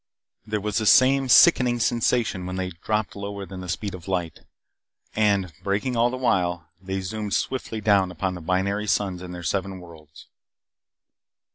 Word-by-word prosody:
There 105 Hz, 0 st, -1 dB
was 105 Hz, +1 st, -2 dB
the 110 Hz, -, -1 dB
same 135 Hz, +2 st, +5 dB
sickening 125 Hz, -4 st, +6 dB
sensation 115 Hz, -5 st, 0 dB
when 90 Hz, -, -4 dB
they 95 Hz, 0 st, -3 dB
dropped 105 Hz, +5 st, -3 dB
lower 100 Hz, 0 st, -6 dB
than 95 Hz, -1 st, -9 dB
the 90 Hz, -, -8 dB
speed 100 Hz, +3 st, -3 dB
of 90 Hz, -1 st, -10 dB
light. 90 Hz, -4 st, -2 dB, 0.8 s
And, 100 Hz, -5 st, +1 dB
braking 105 Hz, +6 st, -1 dB
all 120 Hz, +1 st, +3 dB
the 130 Hz, -, -4 dB
while, 90 Hz, -9 st, 0 dB
they 95 Hz, 0 st, -4 dB
zoomed 105 Hz, +2 st, -3 dB
swiftly 115 Hz, -4 st, -3 dB
down 100 Hz, -3 st, +3 dB
upon 90 Hz, +2 st, -3 dB
the 90 Hz, -, -8 dB
binary 100 Hz, +5 st, -1 dB
suns 95 Hz, -3 st, 0 dB
and 90 Hz, -1 st, -8 dB
their 90 Hz, -1 st, -7 dB
seven 95 Hz, +2 st, -2 dB
worlds. 80 Hz, -4 st, -14 dB
100 Hz, 165 wpm, -24 LUFS, 90-110 Hz, 0.8 s, sickening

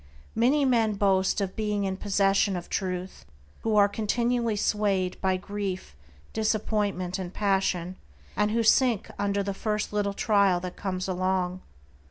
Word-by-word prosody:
Many 270 Hz, +6 st, +3 dB
men 230 Hz, -4 st, +3 dB
boast 195 Hz, 0 st, +2 dB
of 190 Hz, -1 st, -3 dB
being 210 Hz, -2 st, -1 dB
in 190 Hz, -1 st, -1 dB
possession 195 Hz, 0 st, +2 dB
of 175 Hz, -1 st, -6 dB
Truth 185 Hz, -1 st, -3 dB, 0.4 s
who 220 Hz, -1 st, 0 dB
are 205 Hz, -1 st, +6 dB
continually 235 Hz, +2 st, 0 dB
swayed 200 Hz, -3 st, 0 dB
by 190 Hz, -1 st, +1 dB
grief, 190 Hz, -, -5 dB, 0.4 s
disappointment, 205 Hz, -4 st, -1 dB
and 180 Hz, -2 st, -5 dB
passion, 190 Hz, -3 st, 0 dB, 0.4 s
and 210 Hz, +1 st, +2 dB
who 230 Hz, +2 st, +1 dB
sink 235 Hz, -1 st, +3 dB
under 200 Hz, 0 st, 0 dB
the 200 Hz, 0 st, -2 dB
first 210 Hz, +1 st, -2 dB
little 205 Hz, -1 st, 0 dB
trial 200 Hz, -5 st, +3 dB
that 180 Hz, 0 st, -6 dB
comes 185 Hz, -1 st, -3 dB
along. 185 Hz, 0 st, -1 dB
200 Hz, 145 wpm, -27 LUFS, 185-215 Hz, 0.4 s, are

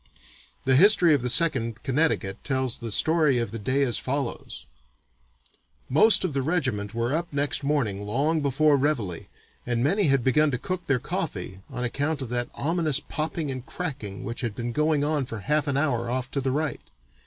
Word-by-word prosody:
The 130 Hz, 0 st, +4 dB
history 180 Hz, 0 st, +6 dB
of 140 Hz, -, +2 dB
the 125 Hz, -, -1 dB
Second 120 Hz, -7 st, +1 dB
Connecticut 130 Hz, -8 st, 0 dB
tells 130 Hz, -2 st, -1 dB
the 115 Hz, -1 st, -6 dB
story 155 Hz, +2 st, +4 dB
of 115 Hz, -4 st, -2 dB
the 115 Hz, -, -5 dB
day 130 Hz, +7 st, +1 dB
as 120 Hz, -4 st, +2 dB
follows: 135 Hz, -2 st, -4 dB, 1.2 s
"Most 185 Hz, -, +5 dB
of 180 Hz, -5 st, -2 dB
the 135 Hz, -, 0 dB
regiment 130 Hz, -, -1 dB
were 115 Hz, +3 st, -1 dB
up 170 Hz, +2 st, -2 dB
next 145 Hz, 0 st, +1 dB
morning 130 Hz, -9 st, 0 dB
long 145 Hz, +10 st, 0 dB
before 145 Hz, +1 st, +3 dB
Reveille 125 Hz, -, -2 dB, 0.4 s
and 120 Hz, 0 st, -1 dB
many 195 Hz, +8 st, +2 dB
had 135 Hz, -4 st, +2 dB
begun 150 Hz, +4 st, +3 dB
to 125 Hz, -, -1 dB
cook 180 Hz, +6 st, -5 dB
their 135 Hz, -, +2 dB
coffee 120 Hz, -, -4 dB
on 125 Hz, -, -5 dB
account 145 Hz, +4 st, -2 dB
of 125 Hz, -, -7 dB
that 120 Hz, 0 st, -2 dB
ominous 155 Hz, -2 st, +1 dB
popping 155 Hz, -1 st, -4 dB
and 130 Hz, -2 st, -6 dB
cracking 130 Hz, -, -6 dB
which 115 Hz, 0 st, -4 dB
had 115 Hz, -5 st, -3 dB
been 120 Hz, 0 st, -4 dB
going 150 Hz, +2 st, +1 dB
on 145 Hz, -3 st, -1 dB
for 115 Hz, -4 st, -6 dB
half 150 Hz, +6 st, 0 dB
an 140 Hz, -1 st, 0 dB
hour 120 Hz, -6 st, 0 dB
off 130 Hz, +1 st, -3 dB
to 140 Hz, -, -2 dB
the 135 Hz, -, -1 dB
right. 150 Hz, +3 st, -2 dB
135 Hz, 190 wpm, -25 LUFS, 120-155 Hz, 1.2 s, history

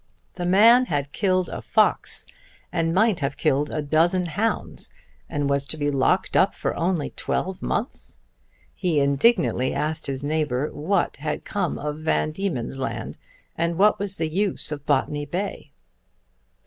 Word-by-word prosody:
The 175 Hz, -1 st, -3 dB
man 230 Hz, +7 st, +6 dB
had 145 Hz, -, -2 dB
killed 185 Hz, 0 st, +1 dB
a -, -, -5 dB
fox -, -, +1 dB, 0.5 s
and 165 Hz, -1 st, 0 dB
might 200 Hz, +1 st, +3 dB
have 140 Hz, -2 st, -2 dB
killed 150 Hz, -1 st, +1 dB
a 155 Hz, -, -2 dB
dozen 170 Hz, +5 st, +2 dB
hounds, 205 Hz, +8 st, -2 dB, 0.4 s
and 145 Hz, -3 st, -1 dB
was 140 Hz, 0 st, +1 dB
to 155 Hz, -, -4 dB
be 145 Hz, -1 st, 0 dB
locked 135 Hz, -2 st, +1 dB
up -, -, +4 dB
only 170 Hz, -3 st, 0 dB
for -, -, -36 dB
twelve 190 Hz, -1 st, -2 dB
months! 245 Hz, +8 st, -3 dB, 0.6 s
He 175 Hz, -6 st, 0 dB
indignantly 140 Hz, -, +2 dB
asked 150 Hz, +2 st, -2 dB
his 135 Hz, 0 st, -3 dB
neighbour 150 Hz, -2 st, -1 dB
what 175 Hz, +5 st, 0 dB
had 150 Hz, +1 st, -4 dB
come 205 Hz, -, -2 dB
of 150 Hz, +1 st, -4 dB
Van 155 Hz, 0 st, 0 dB
Diemen's 155 Hz, -8 st, -3 dB
Land, 130 Hz, -, -4 dB, 0.4 s
and 170 Hz, 0 st, -1 dB
what 210 Hz, +3 st, +4 dB
was 200 Hz, -1 st, -2 dB
the 160 Hz, -, 0 dB
use 190 Hz, +1 st, -1 dB
of 145 Hz, -1 st, -6 dB
Botany 145 Hz, +1 st, 0 dB
Bay. 190 Hz, +7 st, -4 dB
155 Hz, 155 wpm, -24 LUFS, 145-185 Hz, 0.6 s, man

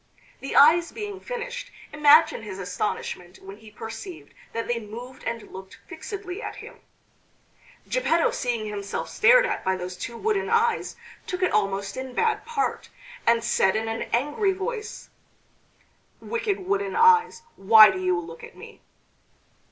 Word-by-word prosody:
The 275 Hz, -, -6 dB
eyes 330 Hz, +4 st, +6 dB
being 415 Hz, -3 st, -6 dB
finished, -, -, -6 dB, 0.2 s
imagine 300 Hz, -1 st, +5 dB
his 205 Hz, -3 st, -8 dB
astonishment 180 Hz, -1 st, -4 dB
when 195 Hz, +1 st, -12 dB
he 220 Hz, 0 st, -15 dB
perceived 225 Hz, -, -9 dB, 0.2 s
that 230 Hz, 0 st, -4 dB
they 240 Hz, -1 st, -1 dB
moved 240 Hz, +4 st, -10 dB
and 230 Hz, -1 st, -5 dB
looked 190 Hz, 0 st, -10 dB
fixedly 395 Hz, -1 st, -7 dB
at -, -, -6 dB
him. -, -, -12 dB, 1.1 s
Geppetto 340 Hz, -9 st, +1 dB
seeing 235 Hz, -3 st, -2 dB
himself 205 Hz, -1 st, -5 dB
stared -, -, +5 dB
at -, -, -3 dB
by 190 Hz, -, +1 dB
those 180 Hz, 0 st, -6 dB
two 230 Hz, +6 st, -7 dB
wooden 420 Hz, -, -1 dB
eyes, 460 Hz, 0 st, +1 dB, 0.3 s
took 365 Hz, 0 st, -3 dB
it 370 Hz, -, +2 dB
almost 195 Hz, 0 st, -1 dB
in 260 Hz, -1 st, -6 dB
bad 455 Hz, 0 st, 0 dB
part, 465 Hz, -3 st, -2 dB, 0.4 s
and 230 Hz, 0 st, +3 dB
said 205 Hz, -5 st, +2 dB
in 220 Hz, +1 st, -1 dB
an 225 Hz, 0 st, -4 dB
angry 295 Hz, -, +1 dB
voice: 425 Hz, +3 st, -6 dB, 1.1 s
"Wicked 460 Hz, -5 st, -2 dB
wooden 400 Hz, +2 st, -2 dB
eyes, 460 Hz, 0 st, +4 dB
why 215 Hz, +1 st, +8 dB
do 190 Hz, -, -5 dB
you 185 Hz, -1 st, 0 dB
look 165 Hz, -1 st, -10 dB
at -, -, -12 dB
me?" -, -, -13 dB
265 Hz, 150 wpm, -25 LUFS, -, 1.1 s, why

